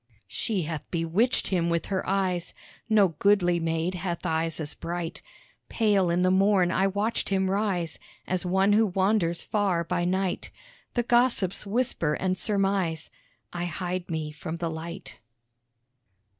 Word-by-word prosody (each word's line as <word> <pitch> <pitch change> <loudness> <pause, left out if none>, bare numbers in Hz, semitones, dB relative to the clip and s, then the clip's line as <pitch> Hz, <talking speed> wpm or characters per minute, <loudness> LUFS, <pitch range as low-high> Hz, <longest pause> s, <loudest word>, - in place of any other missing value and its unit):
She 200 -6 -1
hath 155 -1 -5
bewitched 175 +9 +1
him 170 -3 +1
with 170 -1 0
her 190 -2 -1
eyes. 185 -3 -1 0.3
(No 210 -3 +5
goodly 175 +1 +2
maid 165 +2 -1
hath 175 -1 -4
eyes 165 -1 0
as 150 -1 -3
bright.) 170 0 -5 0.5
Pale 205 -5 +2
in 175 +1 +2
the 185 - +3
morn 190 -1 +4
I 190 +1 +2
watch 205 +4 -1
him 190 -1 +1
rise, 190 -5 -1 0.3
As 185 -1 -1
one 190 +3 +3
who 220 +1 +4
wanders 190 -2 +1
far 195 -5 0
by 175 +1 -1
night. 185 0 -1 0.5
The 240 - +2
gossips 240 -5 +2
whisper 200 -9 0
and 185 -1 0
surmise 195 -4 -1 0.4
I 175 0 -2
hide 180 +1 -3
me 160 -2 -3
from 160 +2 -6
the 170 -1 -3
light. 170 +3 -7
185 Hz, 145 wpm, -27 LUFS, 170-195 Hz, 0.5 s, No